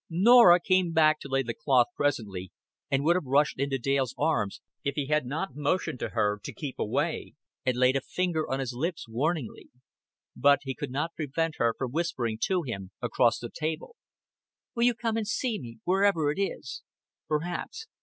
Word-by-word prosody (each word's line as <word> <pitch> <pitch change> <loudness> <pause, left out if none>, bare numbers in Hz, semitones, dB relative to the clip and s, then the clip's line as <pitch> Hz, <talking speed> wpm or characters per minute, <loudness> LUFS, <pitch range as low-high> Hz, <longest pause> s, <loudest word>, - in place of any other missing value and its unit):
Norah 185 +1 +7
came 185 -2 +2
back 155 -1 +4
to - - -8
lay 135 0 +1
the 115 -2 -4
cloth 135 -4 +3
presently, 100 -10 -2 0.4
and 135 -1 +1
would 170 +3 +4
have 180 - -1
rushed 140 +1 +2
into 140 0 0
Dale's 135 -1 0
arms, 145 -10 0 0.2
if 140 -2 -2
he 145 - -1
had 150 -2 0
not 160 +9 -3
motioned 150 -1 -1
to - - -3
her 105 -2 0
to - - -6
keep 145 -4 -7
away, 105 - -2 0.3
and 125 -1 +2
laid 125 +1 +4
a 135 - +1
finger 175 0 -2
on 135 - -1
his 130 -2 -3
lips 160 +4 -3
warningly. 135 +3 -2 0.7
But 145 0 +4
he 135 -1 -3
could 145 0 -5
not 145 +6 -2
prevent 160 +1 -2
her 115 -1 +2
from 130 -3 -3
whispering 130 -8 -2
to 185 -2 0
him 100 -8 -5
across 120 0 +2
the 120 - -7
table. 160 - -4 0.8
"Will 235 0 +2
you 245 -1 +3
come 225 -1 -1
and 220 -2 -2
see 230 0 -1
me, 115 -3 -9
wherever 185 -5 +2
it 175 - -3
is?" 130 -9 -4 0.5
"Perhaps." 175 - -3
145 Hz, 185 wpm, -28 LUFS, 125-170 Hz, 0.8 s, Norah